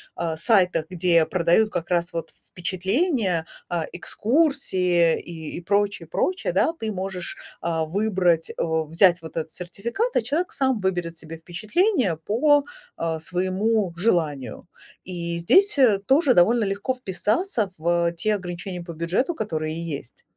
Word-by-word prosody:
а, 165 -2 -2
сайтах, 185 -6 +2
где 170 -2 +3
продают 185 +4 +2
как 175 -3 -4
раз 175 0 0
вот 165 -1 -4
впечатления, 190 - -1 0.2
а, 170 -3 -1
экскурсии 185 - +2
и, 160 -2 -7
и - - -6
прочее, 200 -2 0
и - - -37
прочее, 370 - -1
да. 325 - +3
Ты 220 -1 -2
можешь, 185 -2 -4 0.2
а, 165 -1 -1
выбрать, 180 -2 +1
о 160 -1 0
взять 175 +2 +4
вот 160 0 -9
этот 160 0 -3
сертификат, 235 - -3
а - - +4
человек 310 +9 -1
сам 265 -4 +1
выберет 175 -3 -2
себе 165 0 -8
впечатление 215 - 0
по, 280 - +2 0.3
а, 165 -1 -2
своему 190 +2 0
желанию. 160 - -1 0.4
И 170 -2 -4
здесь, 380 - +4
э, 240 -7 +5
тоже 275 -1 +4
довольно 225 +7 +4
легко 200 +6 -1
вписаться 215 - -1
в, 170 +1 +1
э, - - -8
те 210 +5 0
ограничения 180 -1 -6
по 170 -1 -8
бюджету, 180 - -1
которые 160 -5 -3
есть. 120 - -16
180 Hz, 145 wpm, -24 LUFS, 170-220 Hz, 0.4 s, э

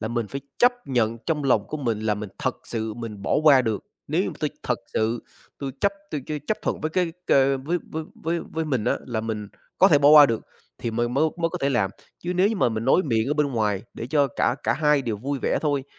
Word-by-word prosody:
là 110 - -3
mình 120 -1 -1
phải 140 - -5 0.2
chấp 245 +1 +6
nhận 115 -3 +1
trong 150 -3 0
lòng 115 -6 +2
của 155 - -4
mình 115 -7 -1
là 110 -1 +1
mình 105 0 -6
thật - - -1
sự 110 -2 -3
mình 110 -3 -7
bỏ - - +1
qua 140 -4 +7
được. 110 -4 -2 0.2
Nếu - - +2
như - - -2
mà - - -9
tôi - - 0
thật - - -1
sự, 115 +2 0 0.4
tôi 140 -1 -4
chấp 200 - +3 0.2
tôi 150 - -2
ch - - -4
chấp 215 - 0
thuận - - -2
với 155 - -2
cái 175 0 0
c - - -28 0.4
với 175 +4 0 0.4
với 165 +1 -1
với 160 0 -1
mình 130 -8 -1
á, - - +2
là 120 -3 -2
mình 110 -2 -4 0.3
có 190 - +7
thể 145 - +6
bỏ 140 0 +5
qua 150 -1 +10
được, 115 -4 -1 0.4
thì 115 - -3
mời 120 +1 0
mới 125 +6 +2
mới 170 -1 0
có - - -5
thể 140 - +2
làm. 110 -8 +1 0.3
Chứ 175 - -3
nếu 185 +3 +4
như 220 - -1
mà 175 - +3
mình 110 -1 -3
nói 135 +8 +4
miệng 115 -4 +1
ở 145 - +1
bên 150 -1 +2
ngoài 105 -4 0
để 115 - -5
cho 145 +2 +3
cả - - +2
cả - - +2
hai 150 -1 +2
đều 115 -4 -2
vui 135 +6 -3
vẻ - - +1
thôi, 145 -3 0
130 Hz, 265 wpm, -24 LUFS, 110-155 Hz, 0.4 s, qua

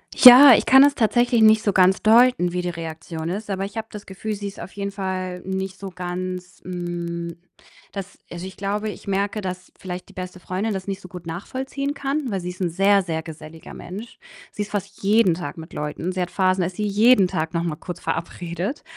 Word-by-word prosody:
Ja, 255 +1 +11
ich - - +1
kann 265 +1 +8
es 285 0 +5
tatsächlich 240 0 +2
nicht 220 0 +6
so 205 - +2
ganz 190 0 +4
deuten, 225 -5 +5
wie 180 0 -2
die 175 - -2
Reaktion 160 -1 -6
ist, 205 +4 -5
aber 195 -1 -2
ich 200 +3 -6
habe 220 - -4
das 210 -1 -9
Gefühl, 205 +3 -5
sie 205 0 -5
ist 195 - -9
auf - - -9
jeden 200 0 -4
Fall 185 -2 -4
nicht 190 0 -4
so 195 -1 -6
ganz, 180 0 -6
hm, 170 -1 -5 0.6
dass 200 0 -7
also, 175 +1 -7
ich 190 - -9
glaube, 205 +2 -2
ich 205 - -10
merke, 200 +2 -1
dass 185 -1 -6
vielleicht 180 -1 -7
die - - -16
beste 185 0 -7
Freundin 195 +5 -2
das 190 -1 -5
nicht 195 -1 -3
so - - -11
gut 180 -1 -10
nachvollziehen 265 +11 -4
kann, 280 0 -2
weil 195 - -1
sie 175 - -5
ist 180 +1 -9
'n 180 - +1
sehr, 195 +3 +3
sehr 160 -3 -3
geselliger 160 0 -11
Mensch. 200 +7 -9 0.3
Sie 210 - -3
ist 205 - -11
fast 200 0 -5
jeden 205 -2 +4
Tag 175 +1 -6
mit 160 0 -10
Leuten, 150 +4 -3
sie 185 0 -3
hat 180 - -3
Phasen, 185 -1 +2
dass 175 +2 -2
sie 210 - -2
jeden 210 0 +5
Tag 160 -1 -3
noch 170 0 0
mal 165 -3 -2
kurz 175 +2 -8
verabredet. 175 - -4
190 Hz, 220 wpm, -22 LUFS, 175-210 Hz, 0.6 s, Ja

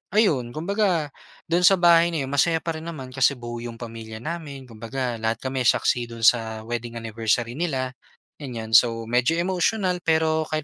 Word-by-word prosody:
ayon 140 - +2
kumbaga 175 -3 0 0.4
do'n 175 +2 +2
sa 195 - +7
bahay 170 -1 +6
na 145 -4 -1
'yon 135 - -6
masaya 160 +3 +2
pa 165 - -2
rin 160 +1 -8
naman 135 -6 -7
kasi 135 +1 +2
buo 120 0 -6
'yong 115 -1 -7
pamilya 115 -1 -8
namin, 150 -5 -6
kumbaga 115 +2 -4
lahat 110 0 0
kami 130 0 -1
saksi 120 -1 +2
do'n 115 -1 -9
sa 110 -2 +2
wedding 120 0 -5
anniversary 115 +1 -1
nila, 135 -7 -1 0.5
ganyan. 115 -6 -6
So, 115 -1 +5
medyo 125 +6 +2
emotional 185 +1 0
pero 160 -1 +2
kahit 155 -1 -2
130 Hz, 175 wpm, -24 LUFS, 115-165 Hz, 0.5 s, sa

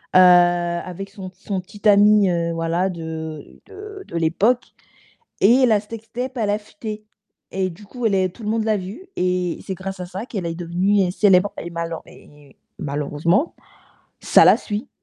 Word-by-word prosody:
heu, - - +9
avec 175 +1 +3
son 195 -2 -9
son 195 +1 -4
petit 205 +3 -5
ami, 205 -1 +6
heu, 170 -1 0
voilà, 165 +3 0
de 160 -3 -7
de 410 -1 -10
de - - -9
l'époque. 190 +10 +2 0.8
Et 240 +7 +5
la 215 -3 +3
sextape, 230 +4 -7
elle 215 -4 0
a 205 - +1
fuité. 215 0 -8 0.5
Et 190 -1 -1
du 185 +5 -13
coup, 245 +3 -7
elle 210 - +2
est 190 -1 +2
tout 235 - -13
le - - -3
monde 225 0 0
l'a 220 -1 +2
vue 195 - -8
et 180 -1 0
c'est 190 - -3
grâce 190 +1 -7
à 180 - -4
ça 185 +4 -6
qu'elle 195 -8 -4
est 165 - -3
devenue 180 +3 +1
célèbre 195 0 +4
et - - -6
malen 170 -1 -4
et 145 -2 -18 0.2
malheureusement, 150 - 0 0.7
ça - - +6
la - - +8
suit. 210 +1 -5
190 Hz, 175 wpm, -21 LUFS, 170-210 Hz, 0.8 s, heu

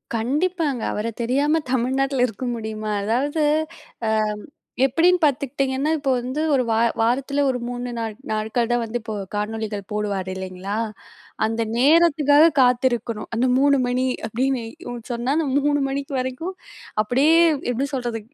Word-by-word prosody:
கண்டிப்பாங்க 290 +2 0
அவர 210 +2 -2
தெரியாம 285 +7 +2
தமிழ்நாட்டில 265 +1 +1
இருக்க 235 +3 -6
முடியுமா? 215 -1 -4
அதாவது, 280 +8 0 0.6
அ - - +2 0.8
எப்படின்னு 345 +7 +3
பார்த்துக்கிட்டிங்கன்னா, 275 0 +1
இப்ப 280 -2 -2
வந்து 260 +5 -3
ஒரு 255 - +2
வா 220 - +2 0.2
வாரத்தில 275 +5 +1
ஒரு 250 -1 -1
3 245 0 -4
நாள் 225 -2 -3 0.2
நாட்கள் 220 +2 -1
தான் 240 0 +2
வந்து 235 +2 -3
இப்போ 220 -1 -5 0.2
காணொளிகள் 210 -1 -3
போடுவார் 200 -3 -2
இல்லங்களா? 190 +2 -5 0.7
அந்த 225 +1 -1 0.2
நேரத்துக்காக 300 +1 +5 0.2
காத்திருக்கணும் 240 -3 +1
அந்த 245 +3 +2
3 280 0 +4
மணி 250 +1 0 0.2
அப்படின்னு 250 +2 -1 0.5
சொன்னா 240 +3 -1
அந்த 315 -3 0 0.2
3 290 0 +2
மணிக்கு 275 +1 -4
வரைக்கும் 260 +9 -4 0.5
அப்படியே 275 +9 +3 0.4
எப்படி 270 +4 -1
சொல்றது? 240 -3 -2
250 Hz, 130 wpm, -22 LUFS, 225-280 Hz, 0.8 s, நேரத்துக்காக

